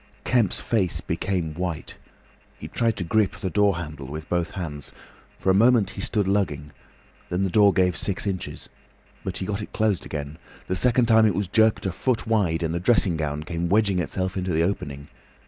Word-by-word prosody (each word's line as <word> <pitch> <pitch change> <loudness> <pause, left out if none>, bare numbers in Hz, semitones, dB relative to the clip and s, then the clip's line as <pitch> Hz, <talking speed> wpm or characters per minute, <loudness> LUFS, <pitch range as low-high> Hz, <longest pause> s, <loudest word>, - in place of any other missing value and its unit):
Kemp's 115 -7 +2
face 95 -7 +1
became 90 -6 -2
white. 85 -1 -4 0.6
He - - -8
tried 115 -2 0
to 95 - -2
grip 100 +3 +1
the 95 - -4
door 100 -2 +3
handle 75 -5 -7
with 75 +3 -7
both 85 -1 0
hands. 75 -7 -6 0.5
For 95 - +1
a - - +4
moment 115 +1 +4
he - - -7
stood 105 -1 0
lugging. 80 -8 -1 0.6
Then 90 +2 0
the 95 - 0
door 100 +1 +6
gave 90 -2 +2
six 95 +3 -1
inches. 95 -3 -4 0.6
But 90 -1 -4
he 95 - -3
got 105 +1 -3
it - - -8
closed 110 -4 +1
again. 75 +1 -6 0.3
The 95 - -2
second 120 +5 +3
time 110 -1 +5
it 100 - 0
was 100 -1 -1
jerked 110 +3 +3
a 95 - 0
foot 125 +5 -1
wide, 95 -7 +1
and 80 0 -1
the 85 - -1
dressing 95 -2 +3
gown 75 -1 -3
came 85 +2 -3
wedging 100 -2 +3
itself 95 +1 -2
into 95 -1 -2
the 80 +1 +2
opening. 70 -6 -3
95 Hz, 200 wpm, -24 LUFS, 85-105 Hz, 0.6 s, door